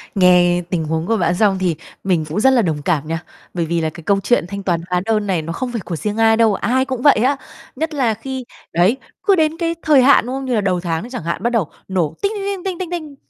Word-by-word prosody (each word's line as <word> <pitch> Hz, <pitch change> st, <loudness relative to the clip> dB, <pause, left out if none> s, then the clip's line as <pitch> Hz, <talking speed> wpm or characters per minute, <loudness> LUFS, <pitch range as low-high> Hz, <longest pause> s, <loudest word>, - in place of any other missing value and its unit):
Nghe 180 Hz, -1 st, +4 dB
tình 170 Hz, -4 st, -1 dB
huống 160 Hz, +2 st, -2 dB
của 225 Hz, -1 st, +2 dB
bạn 175 Hz, -1 st, +1 dB
xong 200 Hz, -1 st, +2 dB
thì 175 Hz, -4 st, 0 dB, 0.3 s
mình 175 Hz, -5 st, +1 dB
cũng 200 Hz, -, -2 dB
rất 265 Hz, +4 st, +5 dB
là 240 Hz, -, +4 dB
đồng 155 Hz, -6 st, -1 dB
cảm 155 Hz, -1 st, 0 dB
nha, 165 Hz, +2 st, -3 dB, 0.3 s
bởi 170 Hz, -2 st, -1 dB
vì 165 Hz, +1 st, -1 dB
là 160 Hz, -, 0 dB
cái 165 Hz, +1 st, -12 dB
câu 200 Hz, +2 st, +2 dB
chuyện 240 Hz, -5 st, +2 dB
thanh 200 Hz, +1 st, -6 dB
toán 170 Hz, -3 st, 0 dB
hóa 180 Hz, 0 st, +1 dB
đơn 215 Hz, -2 st, 0 dB
này 180 Hz, -4 st, 0 dB
nó 165 Hz, +2 st, -5 dB
không 250 Hz, +6 st, -4 dB
phải 230 Hz, -4 st, -3 dB
của 175 Hz, -2 st, -4 dB
riêng 210 Hz, +6 st, -3 dB
ai 225 Hz, 0 st, +4 dB
đâu, 225 Hz, -3 st, +4 dB
ai 260 Hz, +7 st, +1 dB
cũng 260 Hz, -3 st, -4 dB
vậy 290 Hz, -, +6 dB
á, 275 Hz, +1 st, +2 dB, 0.4 s
nhất 315 Hz, +3 st, -3 dB
là 245 Hz, -6 st, +1 dB
khi 260 Hz, +4 st, -6 dB, 0.3 s
đấy, 185 Hz, +9 st, +3 dB, 0.3 s
cứ 395 Hz, -2 st, +4 dB
đến 320 Hz, -1 st, +1 dB
cái 335 Hz, -1 st, -1 dB
thời 295 Hz, -4 st, +5 dB
hạn, 275 Hz, -3 st, +5 dB
đúng 255 Hz, +2 st, -4 dB
không, 270 Hz, 0 st, -4 dB
như 250 Hz, -2 st, 0 dB
là 210 Hz, -, +2 dB
đầu 185 Hz, -2 st, 0 dB
tháng 165 Hz, -1 st, -2 dB
nó 240 Hz, -, -8 dB
chẳng 250 Hz, -10 st, -6 dB
hạn 170 Hz, +4 st, -3 dB
bắt 240 Hz, -, +2 dB
đầu 220 Hz, -10 st, -1 dB, 0.2 s
nổ 180 Hz, -6 st, -1 dB
tinh, 400 Hz, +1 st, +1 dB
tinh, 395 Hz, -1 st, -4 dB
tinh, 395 Hz, -3 st, -3 dB
tinh, 370 Hz, -2 st, -3 dB
tinh, 360 Hz, -2 st, -4 dB
tinh, 310 Hz, -5 st, -5 dB
210 Hz, 285 wpm, -19 LUFS, 175-265 Hz, 0.4 s, vậy